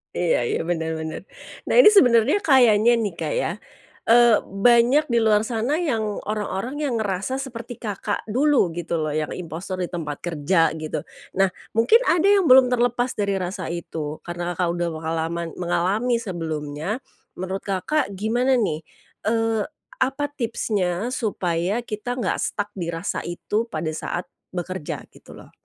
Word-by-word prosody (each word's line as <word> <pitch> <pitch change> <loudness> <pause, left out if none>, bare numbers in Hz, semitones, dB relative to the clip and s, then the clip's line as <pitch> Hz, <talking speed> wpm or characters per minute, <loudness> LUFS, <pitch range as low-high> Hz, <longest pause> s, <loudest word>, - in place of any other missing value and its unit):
Iya 175 -2 +2
iya, - - -1
bener 165 -1 -2
bener. 160 0 -5 0.5
Nah - - +1
ini 420 - +10
sebenernya 245 - +5
kayanya 240 - +5
nih 215 -5 -1
Kak - - -2
ya, - - 0 0.6
eee, 235 -1 +6 0.3
banyak 245 +5 +6
di 235 - +4
luar 215 -2 +3
sana 235 +5 -1
yang 230 -9 0 0.2
orang-orang 215 +6 -3
yang 280 -6 -1
ngerasa 200 +2 -1
seperti 245 -3 -6
Kakak 205 -2 -3
dulu 265 - +3
gitu 170 0 -3
loh 155 - -2
yang 155 0 -2
impostor 175 +2 -5
di 175 - -5
tempat 155 -5 -5
kerja, 165 0 +2
gitu. 155 -1 -4 0.3
Nah 195 -1 +3 0.2
mungkin 235 - +5
ada 340 0 +3
yang 390 -5 +4
belum 255 -1 +7
terlepas 245 0 +1
dari 200 -1 +1
rasa 185 0 -3
itu 160 -3 -5
karena 175 0 -4
Kakak 180 0 0
udah 175 - 0
mengalaman 165 +1 -2
mengalami 190 +7 +1
sebelumnya, 160 - -4 0.3
menurut 190 +1 -4
Kakak 200 +11 0
gimana 240 +6 +1
nih, 195 -11 0 0.5
eee, 225 -1 +1 0.3
apa 270 +2 0
tipsnya 220 -6 -1
supaya 195 -3 -1
kita 215 +2 -4
nggak 250 - -1
stuck 205 -1 -2
di 175 -3 -3
rasa 165 +4 -3
itu 210 +6 -2
pada 155 -5 -3
saat 175 +3 -4 0.3
bekerja, 180 -2 -4
gitu - - -15
loh? - - -14
205 Hz, 150 wpm, -23 LUFS, 175-240 Hz, 0.6 s, ini